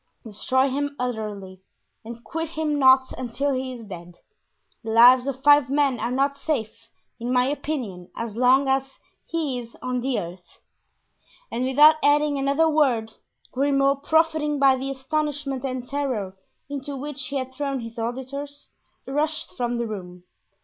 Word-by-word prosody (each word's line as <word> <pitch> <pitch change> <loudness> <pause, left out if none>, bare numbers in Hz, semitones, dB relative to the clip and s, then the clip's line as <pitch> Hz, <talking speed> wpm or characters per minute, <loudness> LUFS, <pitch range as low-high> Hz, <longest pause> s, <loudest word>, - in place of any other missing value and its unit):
destroy 255 +5 0
him 285 +2 -2
utterly 210 -6 -5 0.4
and 235 +1 -9
quit 325 0 -4
him 310 -2 -1
not 260 -1 +5
until 265 +3 -1
he 260 0 -3
is 240 -2 -8
dead; 175 -4 -10 0.7
the 225 - -6
lives 245 +3 +7
of 265 -1 -4
five 290 -3 +6
men 275 -3 +1
are 235 - -1
not 275 +3 +1
safe, 230 -6 -4 0.3
in 240 +2 -3
my 250 0 +3
opinion, 255 - -4
as 230 -2 -4
long 255 +3 +4
as 270 0 -1 0.3
he 300 -7 -2
is 235 -1 -11
on 250 -1 -2
the 260 0 0
earth." 175 +1 -10 0.9
And 245 +2 -1
without 295 +4 +6
adding 290 0 +3
another 280 +4 +2
word, 255 -8 +1 0.4
Grimaud, 275 +1 +2
profiting 315 -1 +2
by 275 -1 +5
the 265 +1 -4
astonishment 275 0 -3
and 255 -2 -4
terror 250 -10 -3 0.3
into 280 0 -5
which 290 +1 -4
he 285 - -5
had 260 -1 -3
thrown 275 -1 -3
his 230 0 -8
auditors, 275 +5 -5 0.4
rushed 300 +3 -2
from 240 -1 -1
the 235 - -1
room. 180 -5 -8
265 Hz, 155 wpm, -24 LUFS, 235-285 Hz, 0.9 s, lives